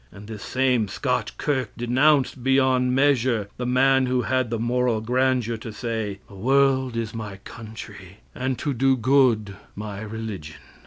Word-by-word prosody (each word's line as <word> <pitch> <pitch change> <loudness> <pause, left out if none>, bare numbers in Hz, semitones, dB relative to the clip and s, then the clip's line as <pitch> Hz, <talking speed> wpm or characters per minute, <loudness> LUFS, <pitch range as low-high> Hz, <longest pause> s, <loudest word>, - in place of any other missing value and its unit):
And 105 +1 -12
this 110 -2 -8
same 125 -3 +1
Scotch 125 +2 -2
kirk 130 -7 -1
denounced, 130 +2 +2
beyond 130 -1 +3
measure, 130 -6 +2
the 125 - -3
man 130 +1 +3
who 125 -1 +1
had 130 -2 0
the 115 - -1
moral 120 0 +1
grandeur 125 0 0
to 115 +1 -8
say, 110 -3 -3
"The 105 - -16
world 130 +3 +2
is 115 -1 -3
my 105 -4 -6
country, 105 -4 -10 0.2
and 130 0 -2
to 145 - -2
do 135 +2 +2
good 115 -5 +2 0.2
my 105 -1 -6
religion." 105 -8 -6
125 Hz, 155 wpm, -24 LUFS, 110-130 Hz, 0.2 s, beyond